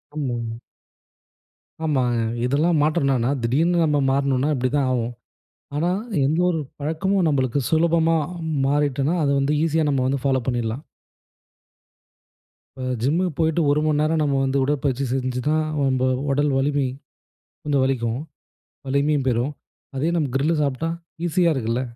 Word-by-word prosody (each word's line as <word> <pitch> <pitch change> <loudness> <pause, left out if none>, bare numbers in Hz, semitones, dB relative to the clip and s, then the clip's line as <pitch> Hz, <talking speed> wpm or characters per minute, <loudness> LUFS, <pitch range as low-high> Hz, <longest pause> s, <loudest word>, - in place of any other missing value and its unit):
ஆமாங்க. 120 -5 -3 1.3
ஆமாங்க. 125 -6 +1 0.2
இதெல்லாம் 150 +5 +2
மாற்றம் 155 0 +1
என்னன்னா, 130 -1 +1
திடீர்ன்னு 165 +9 +2
நம்ம 150 -1 +2
மாறுனோம்ன்னா 140 +1 +1
இப்படி 130 0 0
தான் 135 -2 +1
ஆவும். 120 -1 -1 0.6
ஆனா, 165 +4 +1 0.4
எந்த 155 +5 +1
ஒரு 165 -3 0 0.2
பழக்கமும் 170 +6 0
நம்பளுக்கு 135 -2 +1
சுலபமா 165 0 +3 0.5
மாறிட்டோன்னா, 145 +2 +1
அத 140 - +1
வந்து 140 +2 +1
ஈஸியா 160 -1 +1
நம்ம 135 -2 +1
வந்து 135 -1 -1
ஃபாலோ 130 -1 +2
பண்ணிறலாம். 120 +2 -2 1.9
இப்ப 130 -1 -5 0.2
ஜிம்முக்கு 170 +7 +1
போய்ட்டு 160 0 +1
1 150 - +2
மணி 150 -1 +2
நேரம் 160 +1 +1
நம்ம 140 -2 +1
வந்து 135 +1 0
உடற்பயிற்சி 140 -1 0
செஞ்சுதான், 130 +4 0 0.3
நம்ப 130 0 +1 0.3
உடல் 145 +1 +1
வலிமை 140 0 +1 0.8
கொஞ்சம் 140 -3 +1
வலிக்கும். 120 -3 -1 0.7
வலிமையும் 140 0 +1
பெரும். 125 +4 0 0.4
அதே 155 +5 0
நம்ப 155 -4 0
கிரில்லு 155 +4 +1
சாப்பிட்டா, 145 +4 -1 0.4
ஈஸியா 175 0 +2
இருக்குல்ல! 120 0 -1
140 Hz, 130 wpm, -22 LUFS, 130-155 Hz, 1.9 s, சுலபமா